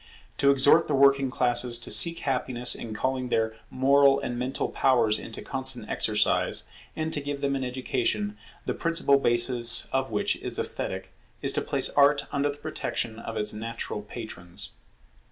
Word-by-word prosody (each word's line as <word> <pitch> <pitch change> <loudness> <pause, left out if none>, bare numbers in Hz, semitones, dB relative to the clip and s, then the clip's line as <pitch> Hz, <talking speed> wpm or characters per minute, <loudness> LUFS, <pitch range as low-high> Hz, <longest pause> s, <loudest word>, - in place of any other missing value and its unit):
To 140 - +4
exhort 140 +4 +5
the - - 0
working 140 0 +4
classes 120 -1 +1
to 120 - -3
seek 170 0 +7
happiness 125 -2 +1
in 110 -2 -6
calling 130 +3 -2
their 110 -1 0
moral 140 +1 +4
and 120 -3 -4
mental 125 +2 -2
powers 115 -5 +2
into 115 - -9
constant 130 -4 -4
exercise, 105 -1 0 0.3
and 160 0 -3
to 145 - -2
give 140 0 -5
them 140 0 0
an 135 - -3
education, 205 - -2 0.3
the - - -1
principal 165 -4 +1
basis 120 -1 0
of 135 0 -1
which 105 -2 0
is - - -5
esthetic, - - -3 0.3
is - - +2
to - - -1
place - - +1
Art 145 0 +3
under 140 +1 0
the 145 - -6
protection 115 -5 -4
of 115 0 -6
its 105 0 0
natural 115 -1 -5
patrons. 105 -5 -9
130 Hz, 165 wpm, -26 LUFS, 115-140 Hz, 0.3 s, seek